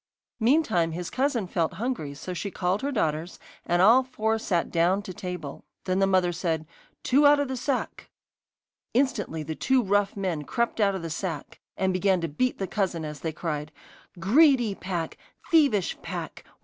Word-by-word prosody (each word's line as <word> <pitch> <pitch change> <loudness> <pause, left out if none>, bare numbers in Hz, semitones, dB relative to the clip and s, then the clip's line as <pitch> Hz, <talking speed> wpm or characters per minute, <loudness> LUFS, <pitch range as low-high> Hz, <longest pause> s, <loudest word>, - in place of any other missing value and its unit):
Meantime 220 - +2
his 175 +1 -5
cousin 260 -5 0
felt 170 -3 -1
hungry, 205 - -3
so 180 +6 -6
she 200 +3 -4
called 185 +1 -1
her 280 +1 -1
daughters, 160 - -1 0.3
and 175 +1 +3
all 235 +6 +7
four 225 -3 -1
sat 175 -6 -1
down 175 +3 +3
to 185 - -7
table. 180 -5 -6 0.2
Then 185 0 0
the 195 - +4
mother 185 -2 +3
said: 165 -2 -2 0.4
'Two 285 +3 +5
out 290 0 +6
of 285 - 0
the 260 - -3
sack.' 255 +1 -3 0.9
Instantly 210 - 0
two 245 - +1
rough 205 0 +1
men 185 -6 -1
crept 235 +9 -1
out 200 -2 +3
of 185 - -5
the 165 - -4
sack, 165 -1 -5 0.2
and 190 -1 +1
began 185 0 +2
to 165 - -1
beat 250 +12 -1
the 195 - -2
cousin 185 -5 -2
as 150 -1 -6
they 160 - -3
cried: 150 -2 -4 0.5
'Greedy 245 - +4
pack! 180 -4 -4 0.3
Thievish 280 - +3
pack! - - -6
190 Hz, 175 wpm, -26 LUFS, 165-235 Hz, 0.9 s, all